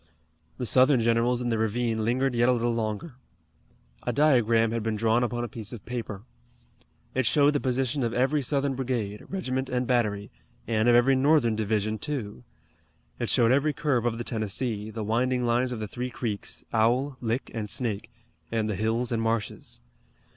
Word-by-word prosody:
The 125 Hz, -, -3 dB
Southern 130 Hz, +2 st, +5 dB
generals 115 Hz, +2 st, +2 dB
in 120 Hz, -, -1 dB
the 115 Hz, -1 st, 0 dB
ravine 110 Hz, 0 st, 0 dB
lingered 130 Hz, +4 st, +1 dB
yet 120 Hz, +1 st, +3 dB
a -, -, +5 dB
little 120 Hz, 0 st, 0 dB
longer. 115 Hz, +5 st, -3 dB, 0.8 s
A -, -, -2 dB
diagram 115 Hz, -5 st, +3 dB
had 115 Hz, 0 st, -1 dB
been 110 Hz, 0 st, -1 dB
drawn 110 Hz, +2 st, +2 dB
upon 120 Hz, 0 st, -2 dB
a -, -, -2 dB
piece 110 Hz, +1 st, -7 dB
of 115 Hz, -, -9 dB
paper. 115 Hz, -5 st, -5 dB, 0.9 s
It 130 Hz, -2 st, +1 dB
showed 145 Hz, -1 st, +4 dB
the 145 Hz, -, +1 dB
position 130 Hz, +1 st, 0 dB
of 120 Hz, -2 st, 0 dB
every 135 Hz, +5 st, +1 dB
Southern 140 Hz, +1 st, +1 dB
brigade, 120 Hz, -6 st, -3 dB
regiment, 130 Hz, -9 st, -2 dB
and 125 Hz, 0 st, 0 dB
battery, 105 Hz, -5 st, 0 dB, 0.4 s
and 110 Hz, +1 st, +2 dB
of 120 Hz, -, +6 dB
every 125 Hz, +3 st, +5 dB
Northern 130 Hz, -4 st, +3 dB
division, 110 Hz, 0 st, -1 dB
too. 125 Hz, -7 st, -5 dB, 0.8 s
It -, -, -1 dB
showed 115 Hz, -1 st, +4 dB
every 140 Hz, +3 st, +2 dB
curve 130 Hz, -7 st, 0 dB
of 115 Hz, -1 st, -1 dB
the 120 Hz, -, -3 dB
Tennessee, 110 Hz, -1 st, -3 dB
the 110 Hz, 0 st, -5 dB
winding 125 Hz, +3 st, +1 dB
lines 120 Hz, +2 st, +1 dB
of 120 Hz, -, -4 dB
the 105 Hz, -, -4 dB
three 125 Hz, +4 st, -4 dB
creeks, 110 Hz, -4 st, -5 dB
Owl, 125 Hz, +5 st, +2 dB
Lick, 120 Hz, +2 st, -2 dB
and 110 Hz, -3 st, -4 dB
Snake, 110 Hz, -5 st, -3 dB, 0.4 s
and 110 Hz, -2 st, 0 dB
the 105 Hz, -, -1 dB
hills 115 Hz, +5 st, -1 dB
and 115 Hz, -1 st, 0 dB
marshes. 115 Hz, -, -3 dB
120 Hz, 180 wpm, -27 LUFS, 110-130 Hz, 0.9 s, of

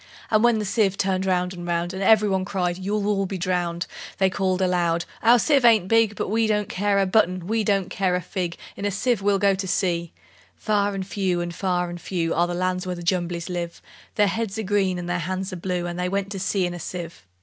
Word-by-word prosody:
And 215 Hz, 0 st, +4 dB
when 240 Hz, -2 st, +4 dB
the 210 Hz, -, -2 dB
sieve 195 Hz, -1 st, +1 dB
turned 190 Hz, 0 st, 0 dB
round 180 Hz, 0 st, +1 dB
and 175 Hz, -1 st, -7 dB
round, 170 Hz, +1 st, -1 dB
And 190 Hz, -, -5 dB
every 215 Hz, +1 st, +5 dB
one 190 Hz, -2 st, +1 dB
cried, 180 Hz, -2 st, -2 dB
"You'll 200 Hz, +2 st, -1 dB
all 195 Hz, -2 st, +1 dB
be 190 Hz, -, -4 dB
drowned!" 175 Hz, -1 st, -1 dB, 0.3 s
They 190 Hz, -1 st, +2 dB
called 190 Hz, -1 st, 0 dB
aloud, 175 Hz, -2 st, +1 dB, 0.2 s
"Our 235 Hz, +2 st, +6 dB
sieve 275 Hz, +3 st, +3 dB
ain't 220 Hz, -6 st, +5 dB
big; 225 Hz, -1 st, +3 dB
But -, -, -3 dB
we 225 Hz, +1 st, +2 dB
don't 210 Hz, -2 st, +1 dB
care 200 Hz, +1 st, 0 dB
a 195 Hz, -, +3 dB
button, 185 Hz, -3 st, +2 dB
we 220 Hz, +3 st, 0 dB
don't 195 Hz, -3 st, 0 dB
care 185 Hz, -2 st, +1 dB
a 180 Hz, -, -1 dB
fig: 175 Hz, -1 st, -3 dB, 0.2 s
In -, -, -7 dB
a -, -, +2 dB
sieve 205 Hz, +3 st, 0 dB
we'll 200 Hz, 0 st, +2 dB
go 200 Hz, 0 st, +3 dB
to 190 Hz, 0 st, -3 dB
sea!" 175 Hz, -2 st, 0 dB, 0.4 s
Far 205 Hz, -1 st, 0 dB
and 190 Hz, -1 st, -3 dB
few, 185 Hz, -3 st, -1 dB
far 180 Hz, 0 st, -1 dB
and 175 Hz, 0 st, -8 dB
few, 170 Hz, -3 st, -1 dB
Are 175 Hz, +1 st, +2 dB
the 175 Hz, -, -3 dB
lands 185 Hz, +1 st, -1 dB
where 180 Hz, -, -2 dB
the 175 Hz, -, -8 dB
Jumblies 170 Hz, -1 st, -1 dB
live: 175 Hz, -2 st, -4 dB, 0.4 s
Their 210 Hz, -, +4 dB
heads 220 Hz, 0 st, -2 dB
are 220 Hz, -, -2 dB
green, 195 Hz, -2 st, +1 dB
and 175 Hz, -1 st, -5 dB
their 175 Hz, 0 st, -1 dB
hands 185 Hz, +3 st, -3 dB
are -, -, -3 dB
blue 180 Hz, 0 st, -2 dB
And 175 Hz, 0 st, -4 dB
they 180 Hz, 0 st, 0 dB
went 195 Hz, +1 st, -2 dB
to 195 Hz, -, -4 dB
sea 190 Hz, 0 st, 0 dB
in 175 Hz, -, -3 dB
a 175 Hz, -, -7 dB
sieve. 170 Hz, 0 st, -7 dB
190 Hz, 245 wpm, -24 LUFS, 175-205 Hz, 0.4 s, Our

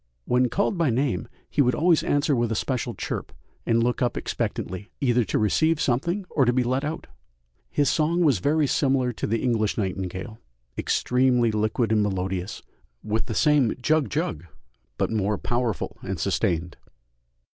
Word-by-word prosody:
When 125 Hz, 0 st, +2 dB
called 200 Hz, -, 0 dB
by 165 Hz, -4 st, +3 dB
name 130 Hz, +2 st, 0 dB, 0.2 s
he 150 Hz, -, +1 dB
would 125 Hz, -3 st, +3 dB
always 170 Hz, 0 st, +3 dB
answer 145 Hz, 0 st, +1 dB
with 120 Hz, -1 st, 0 dB
a -, -, 0 dB
special 120 Hz, +1 st, -2 dB
chirp -, -, -4 dB, 0.4 s
and 115 Hz, 0 st, +3 dB
look 120 Hz, +1 st, 0 dB
up 120 Hz, -1 st, 0 dB
expectantly, 95 Hz, +3 st, -3 dB
either 125 Hz, -3 st, +2 dB
to -, -, -1 dB
receive 155 Hz, +9 st, +2 dB
something 170 Hz, +10 st, 0 dB
or 140 Hz, -, +3 dB
to 120 Hz, -, +4 dB
be 125 Hz, 0 st, +1 dB
let 130 Hz, +3 st, 0 dB
out. 155 Hz, +2 st, -4 dB, 0.6 s
His 145 Hz, -1 st, +1 dB
song 165 Hz, +5 st, +2 dB
was 140 Hz, -, +3 dB
very 150 Hz, -, +2 dB
similar 130 Hz, -3 st, +1 dB
to -, -, -3 dB
the 115 Hz, +1 st, -1 dB
English 115 Hz, -4 st, +1 dB
nightingale, 95 Hz, +1 st, -4 dB, 0.4 s
extremely 125 Hz, -2 st, +2 dB
liquid 110 Hz, +1 st, 0 dB
and 110 Hz, -1 st, +3 dB
melodious, 95 Hz, -2 st, -2 dB, 0.4 s
with 110 Hz, +1 st, -1 dB
the 115 Hz, -, -3 dB
same 150 Hz, -6 st, +3 dB
"jug 155 Hz, +3 st, +1 dB
jug," 130 Hz, -, -2 dB, 0.5 s
but -, -, 0 dB
more 105 Hz, -1 st, 0 dB
powerful 120 Hz, -4 st, -2 dB
and -, -, -4 dB
sustained. 85 Hz, +1 st, -1 dB
125 Hz, 165 wpm, -25 LUFS, 110-145 Hz, 0.6 s, to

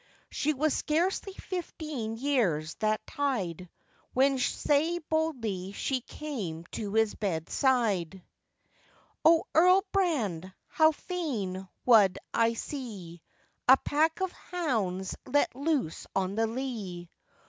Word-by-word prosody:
She 305 Hz, +1 st, 0 dB
was 305 Hz, +2 st, +1 dB
scarcely 360 Hz, +5 st, 0 dB
fifteen 305 Hz, -, -5 dB
years 210 Hz, -, +1 dB
that 215 Hz, 0 st, 0 dB
tide, 195 Hz, -, -2 dB, 0.5 s
When 270 Hz, +1 st, +3 dB
sae 300 Hz, +6 st, +1 dB
boldly 255 Hz, -, -2 dB
she 260 Hz, +4 st, -1 dB
came 215 Hz, -, -6 dB
to 210 Hz, -1 st, -4 dB
his 220 Hz, -1 st, +3 dB
bed 165 Hz, -6 st, -3 dB
side, 200 Hz, -, +1 dB, 1.0 s
'O, 325 Hz, 0 st, +6 dB
Earl 365 Hz, +4 st, +6 dB
Brand, 225 Hz, -, 0 dB, 0.2 s
how 315 Hz, 0 st, +5 dB
fain 235 Hz, -, -4 dB, 0.2 s
wad 210 Hz, -6 st, +6 dB, 0.2 s
I 230 Hz, 0 st, +3 dB
see 210 Hz, -, -7 dB, 0.5 s
A 265 Hz, +1 st, +9 dB
pack 315 Hz, +6 st, +1 dB
of 375 Hz, -1 st, 0 dB
hounds 215 Hz, -, -2 dB
let 285 Hz, -1 st, +2 dB
loose 280 Hz, -, -1 dB
on 190 Hz, 0 st, 0 dB
the 225 Hz, +2 st, +1 dB
lea. 220 Hz, -8 st, -5 dB
245 Hz, 115 wpm, -29 LUFS, 195-305 Hz, 1.0 s, A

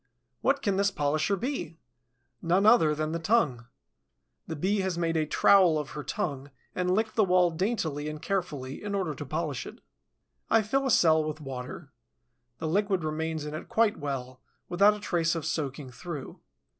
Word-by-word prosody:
What 275 Hz, +1 st, +1 dB
can 200 Hz, -2 st, +1 dB
this 200 Hz, 0 st, +3 dB
polisher 155 Hz, +2 st, 0 dB
be? 195 Hz, -, -4 dB, 0.6 s
None 180 Hz, +4 st, +2 dB
other 165 Hz, -9 st, +5 dB
than 155 Hz, +1 st, -2 dB
the 165 Hz, -, -2 dB
tongue. 155 Hz, -, +1 dB, 0.8 s
The 160 Hz, -, -4 dB
Bee 195 Hz, +7 st, 0 dB
has 190 Hz, -2 st, -1 dB
made 165 Hz, -1 st, 0 dB
a 155 Hz, -1 st, +1 dB
trowel 180 Hz, -1 st, +5 dB
of 150 Hz, -2 st, -4 dB
her 150 Hz, -, -6 dB
tongue 145 Hz, -10 st, -3 dB, 0.2 s
and 180 Hz, 0 st, 0 dB
licked 220 Hz, +1 st, 0 dB
the 220 Hz, -, +4 dB
wall 180 Hz, -2 st, +4 dB
daintily 160 Hz, -5 st, -2 dB
and 155 Hz, 0 st, -6 dB
carefully 150 Hz, -8 st, -3 dB
in 205 Hz, -1 st, -3 dB
order 185 Hz, -6 st, -1 dB
to -, -, -7 dB
polish -, -, -3 dB
it. -, -, -11 dB, 0.7 s
I 225 Hz, -1 st, +4 dB
fill 270 Hz, +6 st, 0 dB
a -, -, 0 dB
cell 160 Hz, -8 st, +4 dB
with 155 Hz, 0 st, -4 dB
water. 130 Hz, -4 st, -7 dB, 0.7 s
The 160 Hz, -, -4 dB
liquid 195 Hz, +1 st, +1 dB
remains 155 Hz, 0 st, -2 dB
in 150 Hz, -, -5 dB
it 155 Hz, -, -7 dB
quite 220 Hz, -2 st, +2 dB
well, 130 Hz, -3 st, -5 dB, 0.3 s
without 200 Hz, +4 st, +5 dB
a -, -, -8 dB
trace 170 Hz, -4 st, 0 dB
of 165 Hz, -, -4 dB
soaking 140 Hz, -3 st, -3 dB
through. 150 Hz, +1 st, -7 dB
165 Hz, 180 wpm, -28 LUFS, 150-200 Hz, 0.8 s, other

